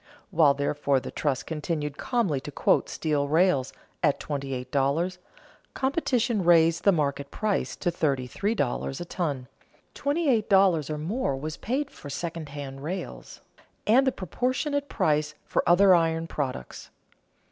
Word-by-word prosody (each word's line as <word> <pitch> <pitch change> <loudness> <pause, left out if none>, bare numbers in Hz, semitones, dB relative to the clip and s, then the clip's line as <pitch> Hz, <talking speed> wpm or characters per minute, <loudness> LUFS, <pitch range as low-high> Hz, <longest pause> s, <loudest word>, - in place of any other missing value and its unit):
While, 150 -4 +5
therefore, 140 -1 +1
the - - -7
trust 140 -4 -1
continued 150 -2 -3
calmly 210 - 0
to 145 - -8
quote - - +2
steel 150 -3 -1
rails 155 -4 +2 0.3
at 145 -5 +2
twenty 140 -2 -4
eight 125 -1 -5
dollars, 155 +7 0 0.6
competition 255 - +1
raised 165 -1 +4
the 200 - +7
market 140 -4 -1
price 215 -2 -1
to 175 - -1
thirty 140 -6 0
three 205 - -2
dollars 135 - -2
a 175 - -5
ton; 145 -8 -3 0.5
twenty 295 +3 -1
eight 225 -6 +2
dollars 190 -7 +4
or 155 - -2
more 160 - -1
was 155 +3 -5
paid 275 +5 -2
for 145 - -10
second 165 +1 -5
hand 140 -2 -7
rails, 175 +6 -6 0.4
and 260 +5 +5
a - - +4
proportionate 260 - -2
price 150 0 +1
for - - +1
other 190 +2 +7
iron 165 -1 +2
products. 135 - -5
160 Hz, 150 wpm, -27 LUFS, 140-195 Hz, 0.6 s, the